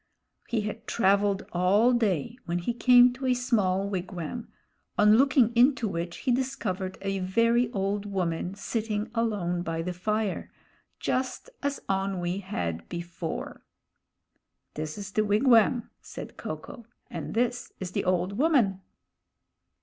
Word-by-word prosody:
He 230 -3 0
had 210 0 -6
traveled 200 -1 +2
all 200 +7 +4
day, 215 - 0
when 170 +1 0
he 175 +7 -1
came 245 0 +6
to 260 +1 -4
a 250 - +3
small 205 -6 +1
wigwam, 185 +3 -4 0.5
on 210 +1 +6
looking 255 -3 +4
into 245 -1 +4
which 170 -2 -4
he 255 - +3
discovered 210 -7 -2
a 195 0 -1
very 230 +5 +2
old 200 0 -1
woman 180 -1 -2
sitting 215 0 -3
alone 205 -7 0
by 165 -1 -3
the 180 +1 -3
fire; 210 +3 -2 0.5
just 260 - -2
as 285 0 -1
Onwee 195 -1 -1
had 85 - -4
before. 170 -1 -5 1.1
This 155 +2 -5
is 205 0 -6
the 215 - +2
wigwam, 230 +2 +4
said - - -9
Ko - - -5
ko, 235 -2 -12 0.2
and - - -5
this 245 +1 0
is 185 -2 -5
the - - -1
old 185 +3 0
woman. 245 - +3
205 Hz, 135 wpm, -27 LUFS, 185-235 Hz, 1.1 s, came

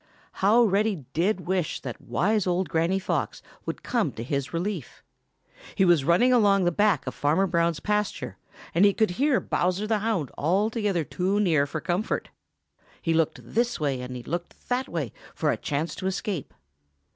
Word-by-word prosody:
How 215 +5 +6
Reddy 200 - +1
did 185 +4 +1
wish 180 -2 -1
that - - -7
wise 210 0 +1
old 180 -1 0
Granny 165 +4 +1
Fox 195 - -2 0.2
would - - -4
come 225 - 0
to 115 - -6
his 140 +3 -2
relief. 175 - -4 0.7
He 190 - +4
was 170 -6 +4
running 200 - +4
along 200 -5 +4
the 175 - +3
back 200 -3 +2
of 130 - -4
Farmer 155 +7 +2
Brown's 170 -3 +1
pasture, 210 +3 -1 0.4
and 175 - +4
he 200 -1 +5
could 220 -5 +2
hear 270 +7 +2
Bowser 185 +4 0
the 215 0 +1
Hound 205 - -1
altogether 200 - +1
too 185 +6 -1
near 160 -8 +3
for 155 - -4
comfort. 180 +5 -1 0.7
He 165 - 0
looked 160 -1 +1
this 240 -1 0
way 140 -4 -1
and 125 0 -6
he 125 - -7
looked 175 +5 -6
that 250 +1 0
way 150 -10 -3 0.2
for - - +1
a - - 0
chance 150 +2 -2
to 190 - -3
escape. 190 -4 -3
185 Hz, 175 wpm, -26 LUFS, 160-210 Hz, 0.7 s, How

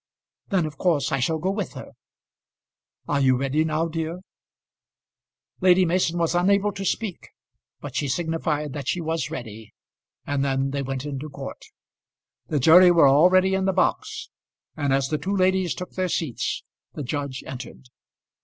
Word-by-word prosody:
"Then 190 -5 +1
of 155 -1 -7
course 155 -7 +1
I 140 - +1
shall 160 +6 0
go 185 +5 -1
with 200 -2 -4
her. - - -9 1.2
Are 145 - +1
you 130 -2 +4
ready 140 +4 +1
now, 160 +1 0
dear?" 165 +2 -4 1.4
Lady 185 0 +5
Mason 175 0 +1
was 165 -1 +1
unable 200 +3 +2
to 195 0 -6
speak, 195 0 -3 0.5
but 140 -3 -8
she 145 +2 0
signified 150 -1 -2
that 145 -2 -6
she 180 - 0
was 160 -2 -2
ready, 110 -8 -8 0.5
and 140 -1 -1
then 135 0 0
they 140 0 -2
went 135 0 -4
into 145 +1 -5
court. 140 - -8 0.8
The 150 - 0
jury 175 +6 +8
were 170 -5 +6
already 185 +7 +5
in 190 0 +1
the 190 - +1
box, 185 - -1 0.4
and 145 -3 -1
as 135 0 +1
the 155 - -1
two 195 +2 -2
ladies 185 -2 +2
took 180 - -7
their 185 -1 -2
seats, 155 -8 -2 0.3
the 150 - -5
judge 140 0 -4
entered. 130 0 -9
160 Hz, 165 wpm, -24 LUFS, 140-180 Hz, 1.4 s, jury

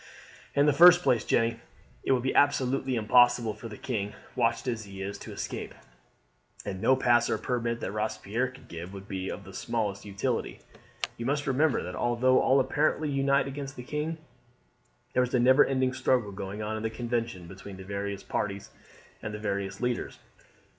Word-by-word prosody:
"In 140 - +5
the 150 - +4
first 175 +3 +8
place, 120 -8 +3
Jeanne, 115 0 +1 0.4
it - - 0
would 125 -2 +2
be 130 - 0
absolutely 135 -2 +2
impossible 120 0 +4
for 110 +2 -9
the 105 -2 -9
king, 105 -5 -3 0.2
watched 115 +1 +1
as 115 -3 -2
he 100 -1 -10
is, 100 +1 -4
to - - -9
escape; - - -5 0.9
and 95 -2 -4
no 130 - +5
pass 120 -2 +3
or - - +1
permit 120 -2 -2
that - - -3
Robespierre 110 +3 -1
could 130 - -15
give 85 +3 -8
would 100 0 -9
be 95 -1 -4
of - - -6
the - - -12
smallest 105 -4 -2
utility. 100 -1 -2 0.6
You 120 - -4
must 145 +1 0
remember, 140 +1 +2
that - - -6
although 120 +2 +3
all 135 +1 +4
apparently 150 +2 +1
unite 140 0 +2
against 135 0 -6
the 125 - -7
king, 150 +5 -3 1.0
there 125 - +3
is 125 0 0
a - - +4
never 130 +3 +6
ending 130 -1 +1
struggle 130 -4 +1
going 100 +2 -5
on 110 +1 -2
in 110 - -4
the 110 - -1
Convention 115 -5 -3
between 95 +2 -10
the 95 - -9
various 100 0 -4
parties 100 -1 -3 0.5
and 105 0 -5
the - - -6
various 100 -1 -3
leaders. 125 -1 -2
120 Hz, 185 wpm, -28 LUFS, 100-130 Hz, 1.0 s, first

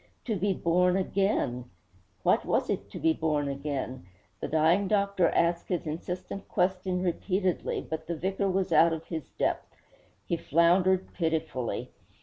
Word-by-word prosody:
To 225 - 0
be 200 +2 +1
born 180 +1 +2
again! 190 - 0 0.6
What - - +3
was - - 0
it - - -3
to - - -8
be 160 - +3
born 150 -3 0
again? 140 -6 -4 0.3
The - - -3
dying 165 +6 +3
doctor 200 -4 +2
asked 170 0 +1
his 175 -3 -2
insistent 180 +5 -5
question 185 0 0
repeatedly, 185 +1 -1
but 160 0 -5
the 170 - -2
vicar 195 +4 -1
was 190 -1 0
out 165 +1 +6
of 160 0 -5
his 160 -4 -5
depth. - - -2 0.5
He 170 - -1
floundered 180 +4 +3
pitifully. 160 -7 -2
175 Hz, 145 wpm, -28 LUFS, 160-190 Hz, 0.6 s, out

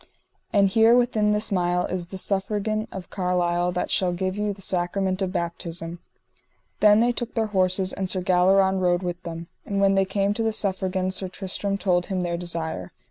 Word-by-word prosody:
And 200 -1 +4
here 225 +4 +5
within 225 -4 +2
this 210 +1 +1
mile 180 -1 +1
is 180 -2 -4
the 190 - -7
Suffragan 210 +3 -1
of 185 -2 -8
Carlisle 180 -1 0
that 180 - -2
shall 185 -2 +1
give 185 +1 -2
you 210 0 -1
the 200 - -9
sacrament 185 +1 -1
of 190 -1 -1
baptism. 170 -1 -4 0.8
Then 210 +1 +6
they 240 +1 +3
took 240 0 -5
their 225 -1 +1
horses 185 0 +2
and 190 -1 -3
Sir 185 0 0
Galleron 190 +1 +3
rode 180 0 +1
with 175 -1 -4
them. 165 -1 -7 0.2
And 200 -1 -2
when 195 0 +4
they 195 0 +3
came 195 +1 0
to 225 - -3
the 225 -1 0
Suffragan 190 -2 -1
Sir 190 0 -2
Tristram 195 +1 -2
told 180 -3 +1
him 190 -2 -2
their 175 -1 -1
desire. 165 - -4
190 Hz, 190 wpm, -24 LUFS, 180-200 Hz, 0.8 s, Then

